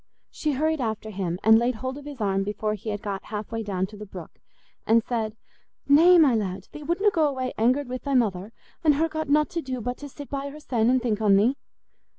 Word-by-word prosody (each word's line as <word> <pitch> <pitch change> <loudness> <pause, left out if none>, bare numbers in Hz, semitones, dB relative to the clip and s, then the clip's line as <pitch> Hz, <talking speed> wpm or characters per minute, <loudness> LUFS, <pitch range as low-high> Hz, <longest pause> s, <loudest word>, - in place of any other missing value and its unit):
She 305 -1 -2
hurried 310 +2 0
after 220 -2 -3
him, 185 -3 -3
and 220 0 +7
laid 240 +1 0
hold 260 +3 -4
of 290 0 -10
his 290 -3 -8
arm 195 -2 0
before 210 +1 -2
he 215 +1 -6
had 205 -1 -4
got 200 -2 -4
half 210 -1 -6
way 225 0 -2
down 190 -3 -2
to 210 +3 -12
the 210 0 -9
brook, 180 -4 -9 0.6
and 225 0 +4
said, 220 -3 -2 0.5
"Nay, 335 +6 +7
my 300 -6 +6
lad, 195 -3 -2
thee 300 - -9
wutna 355 +7 +1
go 320 -5 +2
away 260 -2 -3
angered 255 +5 +2
wi' 255 +1 -4
thy 280 +1 -2
mother, 205 -4 0 0.3
an' 305 -2 +5
her 315 +3 +1
got 315 -2 -4
nought 300 0 +3
to 335 - -2
do 260 -3 -4
but 245 +2 -4
to 290 - -8
sit 285 +1 -10
by 280 0 -4
hersen 255 -6 -1
an' 255 0 +3
think 220 -3 -1
on 205 -2 +5
thee?" 225 +7 +3
245 Hz, 235 wpm, -25 LUFS, 210-285 Hz, 0.6 s, and